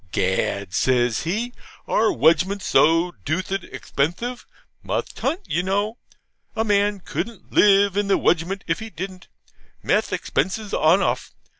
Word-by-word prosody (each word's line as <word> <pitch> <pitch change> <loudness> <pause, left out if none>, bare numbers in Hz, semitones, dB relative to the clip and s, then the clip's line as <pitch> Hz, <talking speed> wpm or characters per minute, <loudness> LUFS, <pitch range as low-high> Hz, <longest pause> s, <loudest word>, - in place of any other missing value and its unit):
'Gad!': 95 0 -1
says 120 +3 +1
he, 225 +8 -2 0.3
'our 220 0 +2
wedgment's 185 +5 +2
so 165 +3 +4
DOOTHID 185 - -2
exthpenthif. 205 - -3 0.4
Must - - -4
hunt, 350 - -1
you 170 - 0
know. 205 +5 -1 0.6
A 220 - +1
man 205 -2 +1
couldn't 220 +5 -6
live 200 -1 +5
in 205 0 0
the 200 - +3
wedgment 175 +4 0
if 165 +1 -1
he 225 - -7
didn't. 185 -1 -7 0.6
Mess - - +1
expenses 205 +2 -2
enawmuth. 175 +5 +2
190 Hz, 130 wpm, -22 LUFS, 165-205 Hz, 0.6 s, live